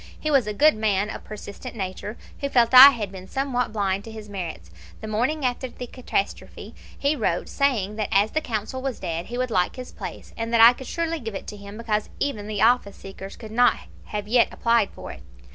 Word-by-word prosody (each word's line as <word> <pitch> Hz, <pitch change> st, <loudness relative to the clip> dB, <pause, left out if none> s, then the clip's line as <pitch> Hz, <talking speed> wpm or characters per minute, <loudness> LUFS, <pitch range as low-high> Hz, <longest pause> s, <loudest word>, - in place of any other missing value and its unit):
He 305 Hz, -, -2 dB
was 270 Hz, -6 st, +3 dB
a -, -, -1 dB
good 305 Hz, +8 st, +5 dB
man, 210 Hz, -1 st, 0 dB
of -, -, -8 dB
persistent 215 Hz, +4 st, -9 dB
nature, 200 Hz, +2 st, -5 dB, 0.2 s
who 280 Hz, -, -2 dB
felt 240 Hz, -2 st, +3 dB
I 260 Hz, +2 st, +13 dB
had 220 Hz, -8 st, -4 dB
been 190 Hz, -1 st, -10 dB
somewhat 260 Hz, -2 st, -1 dB
blind 200 Hz, -2 st, -1 dB
to 225 Hz, -, -8 dB
his 215 Hz, -1 st, -10 dB
merits. 170 Hz, -, -6 dB, 0.3 s
The 220 Hz, -, -7 dB
morning 255 Hz, +7 st, 0 dB
after 250 Hz, +1 st, -1 dB
the 250 Hz, -, -8 dB
catastrophe 240 Hz, -5 st, -4 dB, 0.2 s
he 285 Hz, +2 st, +1 dB
wrote, 210 Hz, -, -1 dB
saying 220 Hz, -8 st, 0 dB
that 215 Hz, -, -2 dB
as 205 Hz, +2 st, +3 dB
the 310 Hz, -, 0 dB
consul 230 Hz, +1 st, -4 dB
was 265 Hz, -2 st, -3 dB
dead 165 Hz, +1 st, -4 dB
he 240 Hz, -, -5 dB
would 255 Hz, -1 st, -1 dB
like 180 Hz, -3 st, +1 dB
his 255 Hz, -1 st, -8 dB
place, -, -, -9 dB
and 230 Hz, 0 st, -4 dB
that -, -, +4 dB
I 230 Hz, +2 st, +9 dB
could 260 Hz, 0 st, -10 dB
surely 330 Hz, -1 st, -2 dB
give 225 Hz, -5 st, -6 dB
it -, -, -6 dB
to 210 Hz, -, -8 dB
him, 200 Hz, 0 st, -10 dB
because 215 Hz, -2 st, -2 dB
"even 215 Hz, -8 st, -2 dB
the 210 Hz, -2 st, -1 dB
office 230 Hz, -4 st, +3 dB
seekers 195 Hz, 0 st, -10 dB
could 220 Hz, -2 st, -10 dB
not 245 Hz, +2 st, +4 dB, 0.3 s
have 210 Hz, -1 st, -4 dB, 0.3 s
applied 230 Hz, -3 st, +2 dB
for -, -, -9 dB
it -, -, -11 dB
yet!" -, -, -22 dB
220 Hz, 225 wpm, -24 LUFS, 200-255 Hz, 0.3 s, I